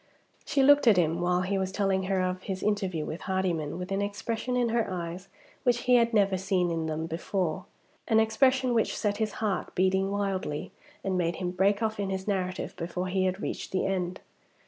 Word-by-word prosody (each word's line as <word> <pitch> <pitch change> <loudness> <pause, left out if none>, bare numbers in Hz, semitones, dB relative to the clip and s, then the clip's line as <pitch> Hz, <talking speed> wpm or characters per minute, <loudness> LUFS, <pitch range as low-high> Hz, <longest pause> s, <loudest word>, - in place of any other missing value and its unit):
She 280 -3 +2
looked 285 -1 +6
at 215 -4 +7
him, 165 0 +2
while 180 0 +2
he 195 +1 0
was 190 0 -1
telling 195 -1 0
her 190 -1 +1
of 185 0 -1
his 190 -1 -4
interview 190 -7 0
with 160 - -5
Hardyman, 180 -6 -1
with 180 +2 -6
an 195 +1 0
expression 225 +4 -2
in 240 -1 +2
her 230 -2 +1
eyes 180 0 -5 0.3
which 240 -2 +2
he 250 -1 +5
had 235 -1 +3
never 200 -4 +3
seen 185 -2 +1
in 165 -1 -1
them 160 +1 -2
before 175 +1 -2 0.4
an 220 -2 +4
expression 255 +3 +3
which 225 -2 +1
set 205 -1 0
his 215 -1 -1
heart 210 -4 -2
beating 190 +1 +2
wildly, 195 -7 -2 0.3
and 190 -2 0
made 170 -1 0
him 180 0 -3
break 200 +4 +2
off 220 -1 -1
in 200 -1 -1
his 190 0 -3
narrative 185 -2 -2
before 180 +2 -3
he 190 0 +1
had 185 +2 -1
reached - - -4
the 190 - 0
end. 185 -2 -2
190 Hz, 205 wpm, -28 LUFS, 180-210 Hz, 0.4 s, at